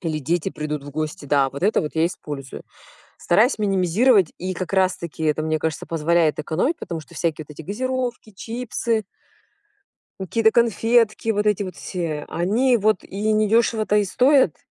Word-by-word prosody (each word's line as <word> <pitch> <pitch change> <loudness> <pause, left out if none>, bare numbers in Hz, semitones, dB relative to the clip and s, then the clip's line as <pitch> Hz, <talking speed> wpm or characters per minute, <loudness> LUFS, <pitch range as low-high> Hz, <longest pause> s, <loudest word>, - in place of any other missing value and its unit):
Или 160 -3 -3
дети 170 +5 -1
придут 150 -3 -5
в 145 - -8
гости. 155 0 -4
Да, 140 -1 +2
вот 140 +6 -4
это 210 - +3
вот 150 - -4
я 160 +1 +3
использую. 145 -6 -7 0.6
Стараюсь 215 +7 +3
минимизировать. 195 +1 +3
И 185 +1 -3
как 185 +2 -5
раз 185 -1 +2
таки 160 -1 -7
это, 155 0 +1
мне 155 0 0
кажется, 160 0 -3
позволяет 165 -1 +1
экономить. 170 - -1
Потому 165 -2 -5
что 155 - -15
всякие 160 -2 -2
вот - - -11
эти 160 - -9
газировки, 250 - -3
чипсы 230 +1 -3 1.2
какие-то 220 +4 +2
конфетки, 230 -1 +2
вот 210 -1 0
эти 210 -1 +2
вот 185 -3 -7
все, 165 -5 -4
они 230 +9 +2
вот 215 -3 +1
и 210 +3 -2
недёшево-то 215 0 +2
и 205 - +2
стоят. 255 - +3
185 Hz, 165 wpm, -22 LUFS, 155-220 Hz, 1.2 s, это